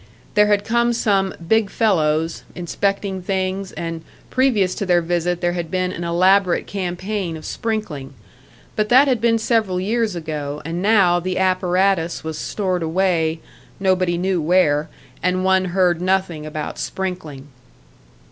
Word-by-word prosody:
There 210 -1 +5
had 205 -1 +2
come 235 +1 +2
some 200 -5 +1 0.2
"big 220 -1 +3
fellows" 165 -7 +1
inspecting 195 +2 -2
things, 190 +1 -2
and 165 -1 -5 0.3
previous 225 -8 +2
to 200 - -3
their 175 -1 +4
visit 175 +1 -1
there 175 0 +1
had 170 -2 -4
been 185 -1 -1
an 175 - -5
elaborate 185 +2 +3
campaign 185 -1 -3
of 155 - -11
sprinkling. 165 -12 -4 0.6
But 215 -1 0
that 265 +4 +6
had 250 -5 +1
been 230 -1 +3
several 220 -5 +1
years 215 +1 0
ago, 150 -3 -4
and 165 +2 -3
now 195 -4 +4
the 185 +1 -3
apparatus 185 -2 +1
was 160 -1 -5
stored 185 -4 -2
away, 165 -1 0 0.4
nobody 185 -2 +1
knew 185 -1 0
where, 155 -2 +2 0.3
and 185 +1 0
one 190 0 +3
heard 180 -1 +1
nothing 180 -4 0
about 155 -1 -5
sprinkling. 160 -7 -5
185 Hz, 145 wpm, -20 LUFS, 170-200 Hz, 0.6 s, that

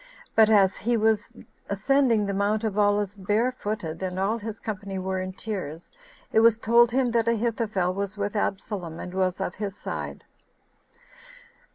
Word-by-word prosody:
But 220 -1 +6
as 200 -3 +4
he 235 +1 +1
was 220 0 +1 0.4
ascending 230 +1 +2
the 200 - -2
Mount 205 +3 0
of 215 -3 -1
Olives 205 -1 +1
barefooted, 205 -4 -1
and 185 -1 -3
all 200 +5 0
his 220 0 -6
company 200 -2 -5
were 190 0 -2
in 185 0 -4
tears, 185 -6 -6 0.4
it - - +4
was 225 -1 +6
told 235 +1 +5
him 250 0 +1
that 230 -1 +1
Ahithophel 220 -5 0
was 200 +1 -4
with 205 +1 -2
Absalom, 190 -5 -3
and 180 - -7
was 185 -1 0
of 190 -2 -2
his 205 -1 -5
side. - - -5
205 Hz, 160 wpm, -26 LUFS, 190-225 Hz, 0.4 s, But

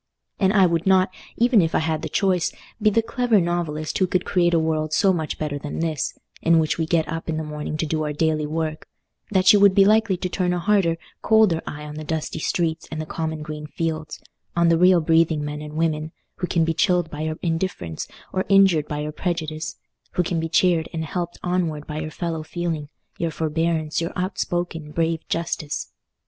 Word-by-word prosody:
And 190 -2 +3
I 195 -2 +5
would 170 0 0
not, 190 -1 +4 0.3
even 235 -3 +5
if 165 -1 0
I - - +5
had 160 -1 0
the 160 - -4
choice, 185 0 +1 0.3
be 215 - +5
the 225 +2 +2
clever 235 -1 +2
novelist 170 -3 -2
who 185 - +3
could 180 0 0
create 175 -2 +2
a - - +4
world 155 -1 -1
so 190 +4 +4
much 160 -3 -3
better 150 -2 -3
than 145 +1 -6
this, 160 -4 -2 0.2
in 165 0 +4
which 160 +1 +1
we 160 - 0
get 160 -2 +2
up 165 +1 -5
in 160 - -1
the 160 - -2
morning 150 0 -4
to 160 - -1
do 155 0 -1
our 150 -1 -1
daily 155 0 0
work, 155 0 -3 0.4
that 190 -1 +5
you 205 - +6
would 200 -1 +6
be 195 -1 +7
likely 215 -2 +3
to 180 - -2
turn 180 0 0
a 175 - -1
harder, 185 -3 +2 0.2
colder 215 -7 +4
eye 150 0 -6
on 150 0 -7
the 155 - -5
dusty 160 +1 -3
streets 165 0 -1
and 160 - -5
the 155 - -3
common 160 -1 -4
green 150 0 -6
fields—on 165 +1 -3
the 165 - +4
real 180 -1 +6
breathing 160 -1 +2
men 150 0 -5
and 150 0 -8
women, 155 -1 0 0.3
who 180 - -2
can 165 -2 +2
be 165 - +1
chilled 175 0 +2
by 150 - -5
your 155 0 -2
indifference 165 - -2 0.3
or 185 - 0
injured 195 -6 +5
by 150 0 -3
your 150 0 -3
prejudice; 155 -2 -3 0.4
who 180 - +2
can 170 -1 -1
be 165 0 -2
cheered 170 -1 +3
and 160 -1 -2
helped 175 +2 -4
onward 170 -5 -1
by 150 0 -5
your 155 0 -4
fellow 165 0 -3
feeling, 160 -2 -3 0.3
your 170 - 0
forbearance, 160 0 -1
your 165 - -3
outspoken, 175 -4 -2
brave 165 0 0
justice. 165 -3 -3
165 Hz, 210 wpm, -23 LUFS, 155-180 Hz, 0.4 s, be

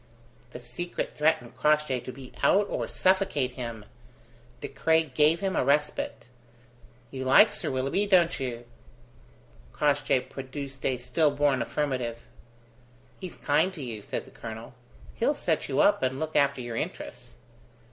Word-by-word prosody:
The 125 - -9
secret 175 +8 -5
threatened 150 -6 +1
Crossjay 150 -1 +2
to 130 - -7
be 130 0 -12
out 205 +1 +4
or - - -2
suffocate 185 -9 +1
him. 115 -4 -6 0.7
De - - -5
Craye 160 +4 +2
gave 155 +5 +3
him 195 -1 -1
a - - +2
respite. 150 -1 0 0.8
"You 130 -1 -5
like 130 +1 +6
Sir - - -2
Willoughby, 135 +10 0
don't 175 -4 +4
you?" 120 -3 -4 1.1
Crossjay 145 -3 +2
produced 135 +1 -8
a 130 -2 0
still 150 +5 +2
born 140 -2 +1
affirmative. 125 -3 -2 0.9
"He's 185 -2 -7
kind 155 +6 +2
to 150 - -6
you," 115 -4 -6
said - - -4
the - - -16
colonel; 115 +2 -8 0.4
"he'll - - +1
set - - -1
you - - +2
up - - +4
and 130 0 -1
look 155 0 -4
after 140 -2 +3
your 120 -1 -5
interests." - - -6
135 Hz, 145 wpm, -27 LUFS, 125-150 Hz, 1.1 s, like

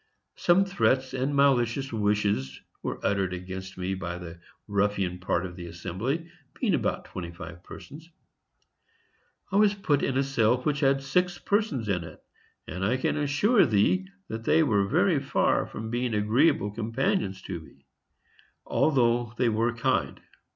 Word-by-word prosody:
Some 180 +3 +3
threats 130 -9 +1
and 135 +2 -1
malicious 135 -2 +2
wishes 105 -10 0 0.2
were - - -4
uttered 95 -2 +1
against 95 +1 -7
me 95 +1 -2
by 90 -2 -4
the 85 -1 -9 0.3
ruffian 100 -3 0
part 90 -1 -1
of 90 -1 -7
the 85 -1 -8
assembly, 95 - -3 0.3
being 225 -7 +1
about 155 - -1
twenty 85 -2 -6
five 85 0 -10
persons. 155 +4 -11 1.4
I 195 - +2
was 205 -1 +4
put 150 -8 +1
in 130 - 0
a 135 - +3
cell 125 -3 +2
which 145 -1 0
had 135 -1 +2
six 180 +5 +1
persons 200 - 0
in 90 -4 0
it, 80 -2 -11 0.5
and 95 - -5
I 115 +7 +2
can 130 - 0
assure 150 - +3
thee 140 - +2 0.2
that 110 0 -5
they 160 +6 +4
were 100 -8 +2
very - - +3
far - - +1
from 110 0 -6
being 120 -1 -1
agreeable 110 +2 +2
companions 110 -3 -1
to 90 -3 -5
me, 70 -3 -18 0.8
although 120 -5 +2
they 125 -2 +2
were 115 +2 +1
kind. 120 -1 -1
115 Hz, 155 wpm, -27 LUFS, 95-140 Hz, 1.4 s, was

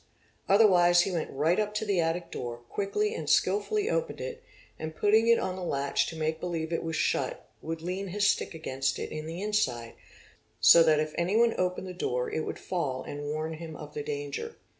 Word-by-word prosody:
Otherwise 180 -4 +6
he 190 - -1
went 170 -3 -2
right 155 +7 +1
up 210 0 -1
to 215 - -1
the 200 -4 +1
attic 165 +1 -1
door, 120 -1 -5
quickly 420 - -1
and - - -4
skilfully 420 0 +2
opened - - -1
it, 485 -1 -6 0.4
and 155 0 -5
putting 220 +5 +3
it 235 0 +6
on 185 - -2
the 185 - -7
latch 140 -4 0
to 165 - -6
make 160 0 -1
believe 165 -2 -3
it - - 0
was 165 -1 -3
shut - - -1
would 160 0 -5
lean 185 +3 -3
his 200 +3 0
stick 200 - +1
against 135 -4 -2
it - - -5
in 155 0 -5
the 170 +4 -5
inside, 130 - -1 0.7
so 110 +10 +8
that 155 -2 +5
if 155 0 -2
anyone 220 +7 +3
opened 180 +1 -1
the 185 - -6
door 125 -8 -2
it 155 - -1
would - - -4
fall 145 -8 -3
and 145 0 -6
warn 155 +2 -3
him 160 0 -8
of - - -9
the 450 - -3
danger. 450 +1 -5
175 Hz, 205 wpm, -29 LUFS, 155-210 Hz, 0.7 s, so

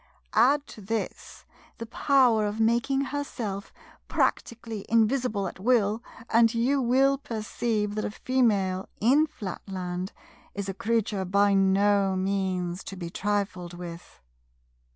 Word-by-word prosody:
Add 280 +6 +4
to 215 - -11
this 220 +3 -5 0.3
the 230 - -6
power 240 -3 +3
of 205 +2 -4
making 235 +5 +2
herself 245 -8 -4 0.4
practically 230 -3 -1
invisible 225 -3 +2
at - - -9
will, 220 0 +2 0.3
and 230 0 +5
you 265 +4 +2
will 265 +3 +3
perceive 220 -4 -2
that 215 0 -2
a - - -1
Female, 205 -6 0
in 280 +8 +4
Flatland, 185 - -5 0.4
is 200 -1 -4
a 195 - -3
creature 220 -2 -1
by 200 +2 +3
no 195 0 +3
means 185 -2 -1
to 195 - -7
be 170 -2 -6
trifled 190 -3 -2
with. 175 - -10
210 Hz, 125 wpm, -27 LUFS, 195-235 Hz, 0.4 s, and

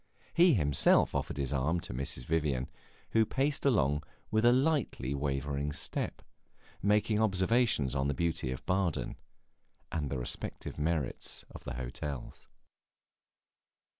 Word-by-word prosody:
He 175 -3 +6
himself 75 -7 +4
offered - - -2
his 70 0 -2
arm 75 +6 +1
to - - -5
Mrs. 60 -1 -2
Vivian, 75 -6 0 0.4
who 115 - +4
paced 135 +6 0
along 75 - +2 0.3
with 110 +1 +2
a 120 - +8
little 130 +2 +4
lightly 105 - -2
wavering 70 +1 -2
step, - - -3 0.6
making 105 +1 +2
observations 100 - +2
upon 70 0 0
the 70 - -1
beauties 80 -6 -1
of - - -13
Baden 95 -3 0 0.8
and 75 -4 -2
the 70 - -2
respective 65 +3 -5
merits 75 -3 -1
of - - -11
the - - -4
hotels. 65 +2 -6
75 Hz, 135 wpm, -31 LUFS, 70-105 Hz, 0.8 s, a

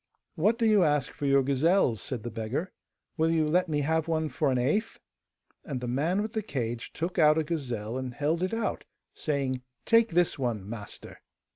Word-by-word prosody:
'What 210 +8 +2
do 230 - +1
you 210 -4 +5
ask 150 -4 +1
for 145 - -4
your 140 0 +4
gazelles?' 140 - +2
said 125 -5 -4
the 120 - -5
beggar. 115 - -3 0.5
'Will 160 0 +2
you 160 -2 +2
let 180 +3 +2
me 150 -1 0
have 160 +2 0
one 160 -1 0
for 150 -1 0
an 130 - +1
eighth?' 155 - 0 0.6
And 135 -5 -4
the 125 - -5
man 160 +11 0
with 220 - -5
the 220 - -1
cage 120 - -4
took 170 +2 -3
out 155 -1 +6
a 160 - +2
gazelle, 125 -7 -3
and 130 -1 -4
held 150 +6 -1
it 185 - 0
out, 225 0 -2 0.3
saying, 135 -4 -2 0.2
'Take 230 0 +5
this 175 -3 +1
one, 115 -7 -2
master! 105 -2 -8
150 Hz, 195 wpm, -28 LUFS, 125-170 Hz, 0.6 s, out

